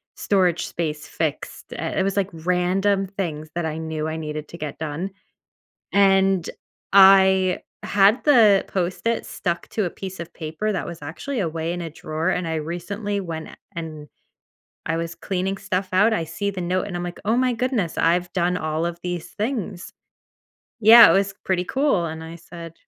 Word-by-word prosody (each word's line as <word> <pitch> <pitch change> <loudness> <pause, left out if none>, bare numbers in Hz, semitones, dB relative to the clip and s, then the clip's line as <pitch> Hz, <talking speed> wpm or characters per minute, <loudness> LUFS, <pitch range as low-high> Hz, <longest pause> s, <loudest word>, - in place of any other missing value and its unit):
storage 180 -4 +1
space 155 -3 -4
fixed," 160 -3 -4
uh, - - -4
it - - +3
was, 195 +1 -1
like, 195 -1 +1
random 180 +4 +1
things 165 -6 -4
that 175 - -1
I 155 - -4
knew 160 -1 -3
I 160 - -3
needed 155 -1 -5
to 170 - -9
get 150 -3 -6
done, 160 +5 -4 0.8
and 195 -2 +4 0.4
I 190 -1 +6 0.2
had 205 +4 +3
the 225 -9 +6
Post-it 190 +5 -1
stuck 170 -1 -3
to 215 - -1
a 175 - -2
piece 190 0 -8
of 170 0 -8
paper 160 +7 -3
that 190 - -3
was 170 -3 -8
actually 220 - -4
away 165 -2 -2
in 175 - -4
a 165 - -5
drawer, 155 +2 -2
and 180 -3 -1
I 160 - -2
recently 175 +6 -3
went 165 -4 -6
a - - -12 0.2
and 155 -3 -6 0.8
I 165 - 0
was 165 0 -3
cleaning 190 +2 -2
stuff 190 -1 -2
out. 205 +4 +4
I 165 - 0
see 165 +6 -3
the 190 -2 -5
note, 185 +3 -1
and 180 - -6
I'm, 175 - -4
like, 175 0 -6
"Oh 220 +3 +2
my 255 -1 +2
goodness. 230 - -1
I've 175 +2 +2
done 180 0 +1
all 155 0 -2
of 170 - -5
these 175 -2 -4
things." 210 -5 -4 0.9
Yeah. 230 +1 +10
It - - +5
was 195 0 +1
pretty 185 -1 0
cool, 265 - +1
and 160 0 -6
I 165 +1 -8
said, 165 0 -10
180 Hz, 185 wpm, -23 LUFS, 165-195 Hz, 0.9 s, Yeah